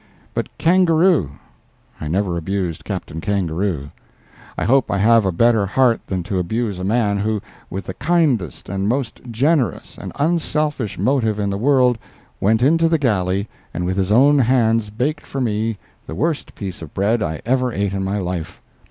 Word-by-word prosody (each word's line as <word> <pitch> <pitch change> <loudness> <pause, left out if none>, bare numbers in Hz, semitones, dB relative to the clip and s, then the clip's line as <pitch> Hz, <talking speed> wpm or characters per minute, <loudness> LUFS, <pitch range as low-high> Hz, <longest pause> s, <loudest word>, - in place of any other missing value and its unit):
But - - -2
Kangaroo—I 165 - 0
never 90 +2 0
abused 90 -1 -3
Captain 80 +2 -5
Kangaroo. 90 -6 -1 0.7
I - - -1
hope 130 +6 +3
I 100 - 0
have 115 +1 +4
a - - +2
better 110 +2 +3
heart 120 +2 +2
than 95 -2 -2
to 95 +2 -2
abuse 105 +2 -2
a - - -4
man 105 0 +1
who, 110 +1 0 0.3
with 95 +1 -5
the 95 - -5
kindest 145 - 0
and 95 +1 -2
most 125 -1 -2
generous 135 +3 0
and - - -7
unselfish 150 - 0
motive 120 -6 +1
in 100 -1 -1
the - - -1
world, 125 -2 +3 0.4
went 110 +4 +2
into 165 +4 +4
the 165 - +3
galley, 100 -7 0 0.3
and 90 - -2
with 95 +2 -1
his 95 0 0
own 140 +6 +5
hands 115 -4 +2
baked 135 +8 -2
for 135 - -5
me 110 -2 -1 0.3
the 80 - -6
worst 155 - -2
piece 95 -4 -6
of 80 -3 -10
bread 105 +4 +1
I 80 -5 -2
ever 125 +1 +1
ate 100 -2 -1
in 95 -1 -2
my 95 +2 -1
life. 90 -4 -4
110 Hz, 170 wpm, -20 LUFS, 95-130 Hz, 0.7 s, own